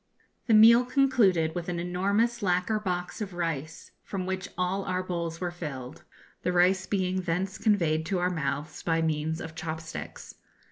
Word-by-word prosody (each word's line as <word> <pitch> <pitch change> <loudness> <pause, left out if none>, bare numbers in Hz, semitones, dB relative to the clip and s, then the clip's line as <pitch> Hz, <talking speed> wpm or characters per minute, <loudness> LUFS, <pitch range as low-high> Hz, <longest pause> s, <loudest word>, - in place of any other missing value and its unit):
The 225 - +5
meal 230 +3 +8
concluded 240 - +3
with 175 0 -4
an 175 -1 -2
enormous 200 +7 0
lacquer 185 +3 +1
box 180 0 -3
of 195 -4 -5
rice, 165 -3 -4
from 190 -2 -4
which 190 0 -3
all 185 +2 0
our 185 0 -2
bowls 170 -2 -3
were 180 -1 -2
filled, 145 -6 -7 0.4
the 180 - 0
rice 185 +2 +3
being 185 -2 0
thence 185 +2 -2
conveyed 170 -8 +2
to 190 - 0
our 180 +1 +1
mouths 150 -2 -3
by 165 -1 +1
means 160 0 -1
of 160 - -7
chop 160 -1 -4
sticks. 160 0 -8
180 Hz, 170 wpm, -28 LUFS, 165-195 Hz, 0.4 s, meal